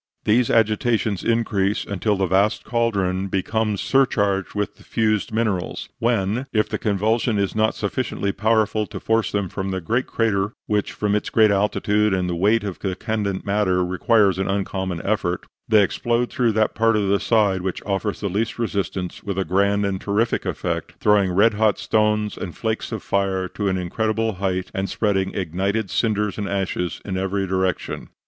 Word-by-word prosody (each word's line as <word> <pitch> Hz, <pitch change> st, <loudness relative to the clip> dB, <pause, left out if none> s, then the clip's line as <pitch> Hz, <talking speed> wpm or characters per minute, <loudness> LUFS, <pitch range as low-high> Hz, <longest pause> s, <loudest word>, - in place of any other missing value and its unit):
These 115 Hz, +3 st, +3 dB
agitations 110 Hz, -2 st, +1 dB
increase 105 Hz, -4 st, +1 dB
until 105 Hz, +1 st, 0 dB
the 95 Hz, 0 st, +1 dB
vast 95 Hz, +4 st, +2 dB
cauldron 100 Hz, -5 st, 0 dB
becomes 105 Hz, +2 st, -1 dB
surcharged 100 Hz, -9 st, +1 dB
with 105 Hz, 0 st, -2 dB
the -, -, -17 dB
fused 110 Hz, -2 st, 0 dB
minerals, 110 Hz, -5 st, -2 dB
when, 115 Hz, +2 st, 0 dB
if 110 Hz, -1 st, +2 dB
the -, -, -3 dB
convulsion 110 Hz, +2 st, +1 dB
is 100 Hz, -1 st, 0 dB
not 110 Hz, 0 st, +2 dB
sufficiently 100 Hz, -1 st, -2 dB
powerful 110 Hz, 0 st, +1 dB
to -, -, -7 dB
force 110 Hz, -3 st, +1 dB
them 100 Hz, -2 st, -1 dB
from 95 Hz, +1 st, -4 dB
the 95 Hz, -1 st, -2 dB
great 115 Hz, +9 st, -1 dB
crater 105 Hz, -2 st, 0 dB
(which, 105 Hz, -1 st, -1 dB
from 105 Hz, -1 st, -1 dB
its 105 Hz, -, 0 dB
great 110 Hz, -2 st, +4 dB
altitude 105 Hz, 0 st, +2 dB
and 90 Hz, -1 st, -1 dB
the 90 Hz, -, -1 dB
weight 105 Hz, +6 st, +2 dB
of 100 Hz, -3 st, -5 dB
the 95 Hz, -2 st, -2 dB
candent 105 Hz, -2 st, -2 dB
matter, 100 Hz, -3 st, +1 dB
requires 95 Hz, +2 st, +2 dB
an 95 Hz, -, -1 dB
uncommon 95 Hz, -3 st, -2 dB
effort), 95 Hz, -4 st, -1 dB, 0.2 s
they 110 Hz, -2 st, +5 dB
explode 120 Hz, +5 st, 0 dB
through 120 Hz, -3 st, +1 dB
that 110 Hz, 0 st, +1 dB
part 115 Hz, 0 st, +2 dB
of 105 Hz, -2 st, +1 dB
the 100 Hz, 0 st, +2 dB
side 105 Hz, -5 st, +2 dB
which 95 Hz, 0 st, -4 dB
offers 100 Hz, +1 st, -2 dB
the 100 Hz, -, -1 dB
least 105 Hz, +4 st, -2 dB
resistance 100 Hz, -5 st, -3 dB
with 100 Hz, -2 st, -4 dB
a 95 Hz, -, 0 dB
grand 100 Hz, +3 st, +2 dB
and 95 Hz, -1 st, -2 dB
terrific 110 Hz, +4 st, 0 dB
effect, -, -, -3 dB
throwing 100 Hz, -3 st, +3 dB
red 105 Hz, +5 st, +4 dB
hot 105 Hz, -1 st, +2 dB
stones 105 Hz, -1 st, +1 dB
and 85 Hz, -, -6 dB
flakes 110 Hz, +1 st, -2 dB
of 110 Hz, -3 st, -4 dB
fire 95 Hz, -1 st, 0 dB
to 100 Hz, +2 st, -3 dB
an 95 Hz, -1 st, +1 dB
incredible 110 Hz, +5 st, -1 dB
height, 95 Hz, -1 st, -2 dB
and 95 Hz, 0 st, -2 dB
spreading 95 Hz, -3 st, 0 dB
ignited 95 Hz, +4 st, -1 dB
cinders 105 Hz, -2 st, 0 dB
and 100 Hz, -, -3 dB
ashes 95 Hz, -3 st, -2 dB
in 95 Hz, -2 st, -3 dB
every 95 Hz, +1 st, -1 dB
direction." 95 Hz, -1 st, -2 dB
100 Hz, 180 wpm, -22 LUFS, 95-110 Hz, 0.2 s, they